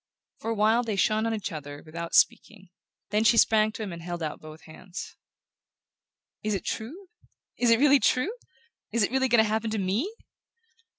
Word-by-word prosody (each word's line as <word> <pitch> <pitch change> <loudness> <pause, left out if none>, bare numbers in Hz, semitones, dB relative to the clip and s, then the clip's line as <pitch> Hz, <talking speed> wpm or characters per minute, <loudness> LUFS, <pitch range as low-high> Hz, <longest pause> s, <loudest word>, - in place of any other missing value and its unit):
For 225 - -5
a 230 - 0
while 220 +3 +3
they 225 -4 -3
shone 215 +3 +1
on 225 - -1
each 210 - -4
other 145 -2 -8
without 165 +1 -5
speaking; 195 -4 +1 0.4
then 210 +1 +2
she 230 +1 +4
sprang 215 -1 +4
to 220 - -5
him 195 -4 -5
and 170 - -8
held 175 0 -5
out 155 - -5
both 155 0 -12
hands. 180 +5 -9 1.3
"Is 215 -1 -1
it 195 - -5
true? 325 - -5 0.5
Is 245 - +3
it 230 - +6
really 285 0 +6
true? 265 - +1 0.6
Is 230 -2 +2
it 200 - 0
really 265 0 +2
going 240 -3 +5
to - - -1
happen 220 +1 -1
to 220 - -2
ME?" 205 - -1
215 Hz, 190 wpm, -27 LUFS, 180-230 Hz, 1.3 s, it